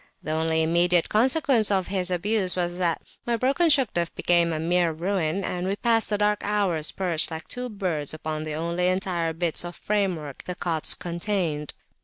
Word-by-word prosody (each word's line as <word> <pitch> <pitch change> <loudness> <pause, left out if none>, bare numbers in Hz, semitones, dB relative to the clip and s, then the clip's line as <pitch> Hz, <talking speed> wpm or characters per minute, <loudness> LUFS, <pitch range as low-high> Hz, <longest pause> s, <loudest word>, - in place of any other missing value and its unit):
The 155 - -3
only 160 0 +1
immediate 170 +1 +3
consequence 255 0 +3
of 190 -2 +1
his 185 -2 -1
abuse 185 +1 +1
was 175 0 -2
that 170 -3 0 0.2
my 235 -1 +1
broken 275 +8 +2
Shugduf 230 - +2
became 170 -1 +2
a 155 - -2
mere 170 +1 +1
ruin, 175 +1 -1
and 180 0 -3
we 195 - 0
passed 225 +1 +1
the 210 - +1
dark 210 0 +1
hours 195 -7 0
perched 175 -4 +1
like 160 -1 -7
two 250 0 -4
birds 180 - -2
upon 155 0 -4
the 155 -1 -4
only 170 +3 -1
entire 180 -3 0
bits 165 0 0
of 175 0 -7
framework 185 -9 -2
the 180 - -4
cots 165 -3 +1
contained. 170 -4 -3
180 Hz, 180 wpm, -25 LUFS, 165-205 Hz, 0.2 s, immediate